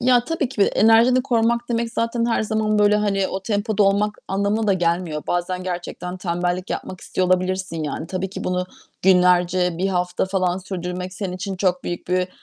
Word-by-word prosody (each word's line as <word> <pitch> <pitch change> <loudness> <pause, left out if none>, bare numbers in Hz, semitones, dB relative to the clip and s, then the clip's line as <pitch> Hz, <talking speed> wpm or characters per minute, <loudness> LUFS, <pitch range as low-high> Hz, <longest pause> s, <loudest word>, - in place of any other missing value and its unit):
Ya, 245 -1 +4
tabii 325 -4 -1
ki 240 -5 -6
de - - +5
enerjini 230 +4 +4
korumak 235 -2 +2
demek 235 -1 -1
zaten 230 0 0
her 230 -2 +1
zaman, 215 -1 0
böyle 210 0 +4
hani, 195 -2 +1
o 190 - -4
tempoda 210 0 0
olmak 205 +2 +2
anlamına 200 +3 0
da 200 - +4
gelmiyor. 170 -3 -1
Bazen 180 +1 -1
gerçekten 180 0 -5
tembellik 180 0 -2
yapmak 185 - -5
istiyor 185 - -1
olabilirsin 185 -2 0
yani. 150 +2 -4
Tabii 185 +1 -3
ki - - -6
bunu 180 0 -1 0.4
günlerce, 180 -1 +3
1 190 - +1
hafta 180 -1 0
falan 185 -1 0
sürdürmek, 180 0 -5
senin 190 -1 -4
için 190 +1 -4
çok 180 -1 0
büyük 175 0 -5
bir, 180 0 +1
190 Hz, 185 wpm, -22 LUFS, 180-215 Hz, 0.4 s, de